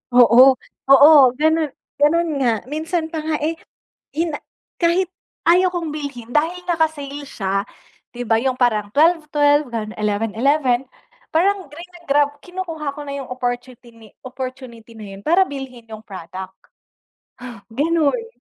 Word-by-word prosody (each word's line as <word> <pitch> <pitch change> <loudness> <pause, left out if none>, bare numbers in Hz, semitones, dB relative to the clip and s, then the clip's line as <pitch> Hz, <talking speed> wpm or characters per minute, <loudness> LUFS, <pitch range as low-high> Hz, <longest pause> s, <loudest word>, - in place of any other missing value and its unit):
Oo, 245 +1 +8 0.4
oo, 285 +3 +9 0.3
ganun, 315 0 +2 0.3
ganun 335 +4 +3
nga. 235 -5 +1
Minsan 320 +2 -2
pa 320 - -3
nga, 310 0 -2
eh, 325 +1 -2 0.5
yun 325 +1 -1
na - - -20 0.4
kahit 345 +1 +1 0.4
ayaw 365 +1 +4
kong 335 -2 -3
bilhin, 285 -6 -6
dahil 325 +7 0
naka-sale 295 -4 -1
siya 195 -5 -2 0.5
'di 245 -1 -6
ba, 225 - +3
yung 255 +1 -1
parang 215 -5 +1
12-12, 295 -3 +3
ganun, 220 -1 -4
11-11, 235 +6 +1 0.5
parang 380 +4 +1
grina-grab 295 -4 -1
kinukuha 335 -5 -5
ko 295 - -8
na 280 - -4
yung 265 -2 -8
opportutini 245 -3 -6
opportunity 255 -3 -8
na 210 -3 -10
yun 195 - -12
para 370 +4 +4
bilhin 260 -4 -8
yung 220 0 -9
product, 190 0 -8 1.2
gano'n. 330 - 0
285 Hz, 130 wpm, -20 LUFS, 240-320 Hz, 1.2 s, oo